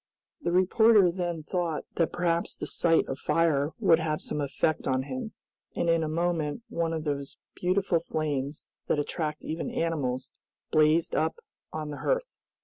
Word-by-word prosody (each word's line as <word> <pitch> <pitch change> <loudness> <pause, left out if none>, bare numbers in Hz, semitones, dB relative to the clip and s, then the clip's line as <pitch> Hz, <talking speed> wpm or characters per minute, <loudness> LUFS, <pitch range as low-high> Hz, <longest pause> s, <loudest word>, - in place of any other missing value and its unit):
The 170 - -1
reporter 195 +1 +5
then 175 -3 -3
thought 170 -2 -2
that 165 - +2
perhaps 170 -1 0
the - - -4
sight 165 -1 +2
of 135 - -4
fire 150 -2 +2
would 165 - +5
have 155 -2 -1
some 150 - -3
effect 150 +2 0
on 130 -1 +1
him, 135 +10 -5 0.4
and 170 - +2
in 165 0 +3
a 160 - -1
moment 165 +2 -1
one 165 -1 -1
of 160 -1 -2
those 140 -2 -3 0.2
beautiful 185 -1 +1
flames, 145 -3 -3 0.2
that - - +2
attract 150 +1 -3
even 160 +1 -3
animals, 135 -6 -2 0.4
blazed 155 +2 +3
up 160 +1 +1 0.4
on 155 -1 -4
the 145 - -6
hearth. - - -1
160 Hz, 160 wpm, -28 LUFS, 150-170 Hz, 0.4 s, reporter